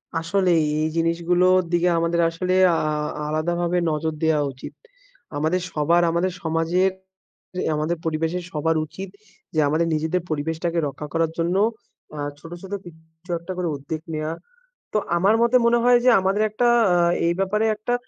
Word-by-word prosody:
আসলেই 175 0 +2 0.2
এই 155 - +1
জিনিসগুলোর 175 +2 +2
দিকে 175 0 +2
আমাদের 170 +1 +1
আসলে 180 +2 -2 0.2
আ-আ-আলাদাভাবে 155 +3 -1
নজর 155 +1 -1
দেয়া 160 -2 +3
উচিত। 130 - -10 0.6
আমাদের 160 +5 0
সবার, 165 +3 +3
আমাদের 175 +3 0
সমাজের 165 +4 +1 0.8
আমাদের 155 +3 -1
পরিবেশের 165 +2 -1
সবার 160 +2 0
উচিত 190 +5 -8 0.5
যে - - +2
আমাদের 160 +3 +1
নিজেদের 160 +4 0
পরিবেশটাকে 160 +3 -2
রক্ষা 140 +2 -7
করার 165 -1 +1
জন্য 170 +2 0 0.6
আ - - -5 0.2
ছোট, 165 +2 -12
ছোট 195 +1 -8
কিছু 160 +1 -14
একটা 170 +3 -8
করে 180 -1 -1
উদ্যোগ 155 +3 -6
নেয়া। 155 0 -2 0.6
তো - - +2 0.2
আমার 195 +5 +3
মতে 235 +1 +3
মনে 235 0 +4
হয় 245 0 +6
যে - - +7
আমাদের 195 +3 +1
একটা 240 +3 +1 0.3
আ - - +3 0.3
এই 170 - +2
ব্যাপারে 210 +3 +1
একটা 215 +3 -3
170 Hz, 150 wpm, -23 LUFS, 155-185 Hz, 0.8 s, যে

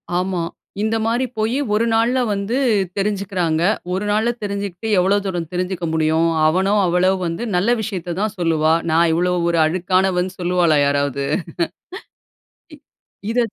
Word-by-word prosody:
ஆமா. 180 -1 -1 0.4
இந்த 220 +1 0
மாரி 240 +3 +1
போயி, 225 +5 0 0.2
1 220 +2 +2
நாள்ல 235 +3 +2
வந்து 200 +5 -1 0.4
தெரிஞ்சுகிறாங்க. 195 -5 -1 0.3
1 195 +3 -2
நாள்ல 220 +3 +1
தெரிஞ்சுகிட்டு, 200 0 -4
எவ்ளோ 195 +3 +3
தூரம் 175 -4 -3
தெரிஞ்சுக்க 180 -1 -2
முடியும்? 160 +1 +2 0.2
அவனோ 190 +5 +2
அவளோ 180 +2 +2
வந்து 170 +8 -3
நல்ல 210 +7 +2
விஷயத்தை 185 -5 -4
தான் 215 0 -2
சொல்லுவா. 160 -2 +2 0.2
நான் 165 +1 +4
இவ்வளோ 180 +2 +1 0.2
ஒரு 170 -1 +1
அழுக்கானவன்னு 185 +2 0
சொல்லுவாளா 175 -3 +2
யாராவது? 140 -1 0 1.5
இ - - -11 0.5
இத 245 - +1
185 Hz, 135 wpm, -20 LUFS, 170-205 Hz, 1.5 s, நான்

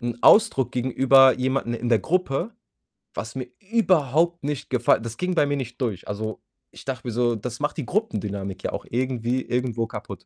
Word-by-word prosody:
‘n 120 -1 -3
Ausdruck 135 - +5
gegenüber 130 +1 +5
jemandem 130 -2 0
in 120 - -2
der 115 - +5
Gruppe, 180 - -1 0.6
was 115 +3 -6
mir 130 -1 -4 0.2
überhaupt 170 - +2
nicht 145 -1 -3
gefall 125 -2 +3
das 115 0 -6
ging 180 0 -1
bei 150 - +4
mir 145 0 -1
nicht 125 -2 -6
durch, 105 -7 -2
also, 110 0 -4 0.3
ich - - -13
dachte 130 -2 -5
mir 120 - -3
so, 120 0 +1
das 115 +2 -6
macht 150 - -1
die 150 - -3
Gruppendynamik 105 - -3
ja - - -2
auch - - -5
irgendwie 125 0 -1
irgendwo 120 -3 -1
kaputt. - - -8
125 Hz, 185 wpm, -24 LUFS, 115-145 Hz, 0.6 s, Ausdruck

